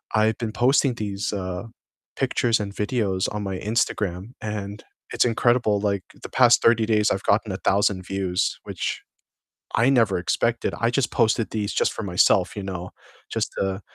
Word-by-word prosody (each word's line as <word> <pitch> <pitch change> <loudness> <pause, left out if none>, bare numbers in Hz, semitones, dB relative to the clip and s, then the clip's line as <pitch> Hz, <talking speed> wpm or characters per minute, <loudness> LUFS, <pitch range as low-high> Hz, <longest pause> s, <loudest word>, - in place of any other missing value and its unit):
I've 110 +1 +3
been 115 -3 -3
posting 125 +3 +2
these, 100 -2 -3
uh, 90 -1 -4 0.5
pictures 115 -1 +1
and 100 -1 -5
videos 105 -4 0
on 105 0 -3
my 95 -2 -3
Instagram, 105 -2 -1
and 105 -1 -5 0.3
it's - - +3
incredible, 120 -2 +2
like, 100 -2 -1 0.2
the - - -7
past 120 -2 +5
30 115 -1 +4
days 105 -1 +2
I've 95 - -1
gotten 105 0 +1
1,000 95 0 +1
views, 95 -2 -1
which - - -4 0.8
I 120 +3 +4
never 115 -8 +3
expected. 115 +6 0
I 115 - +2
just 120 -2 0
posted 115 -1 +2
these 105 -2 -2
just - - +1
for 115 - -6
myself, 90 -3 +2
you 100 - -4
know, 90 -2 -5 0.4
just - - -2
to 95 0 -1
105 Hz, 165 wpm, -24 LUFS, 95-115 Hz, 0.8 s, past